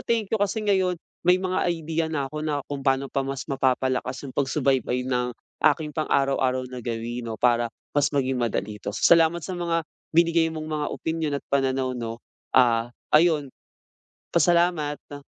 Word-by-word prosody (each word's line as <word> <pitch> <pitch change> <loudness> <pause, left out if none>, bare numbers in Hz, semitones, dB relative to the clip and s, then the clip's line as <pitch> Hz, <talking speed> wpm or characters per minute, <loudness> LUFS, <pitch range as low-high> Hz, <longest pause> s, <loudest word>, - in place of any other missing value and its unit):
thank 225 -3 -1
you 220 - +1
kasi 210 +2 0
ngayon, 190 -3 +2 0.2
may 180 +1 +4
mga 185 0 -1
idea 165 -1 -1
na 145 -4 -2
'ko 150 - -4
na 150 -2 -2
kung 140 -1 -5
paano 135 0 0
pa 135 - +1
mas 135 0 -4
mapapalakas 130 0 0
'yong 130 - -7
pagsubaybay 135 -3 +1
ng 125 -1 -1 0.3
aking 150 0 +3
pang-araw-araw 135 -4 +1
na 125 - -5
gawi 120 +1 -4
'no, 115 -1 -5
para 120 -1 +3 0.3
mas 145 0 +3
maging 135 -2 0
madali 105 -3 -2
'to. - - -3
Salamat 165 - +4
sa 185 - -4
mga 170 -2 -1 0.3
binigay 165 0 +3
mong 155 -1 -5
mga 150 -1 -1
opinyon 160 -2 -2
at - - -21
pananaw, 135 -1 +1
'no? 115 -1 -5 0.3
Ah, 120 -1 +4 0.2
ayun, 155 -2 +4 0.9
pa - - +4
salamat. 155 -5 +1
145 Hz, 165 wpm, -25 LUFS, 130-165 Hz, 0.9 s, may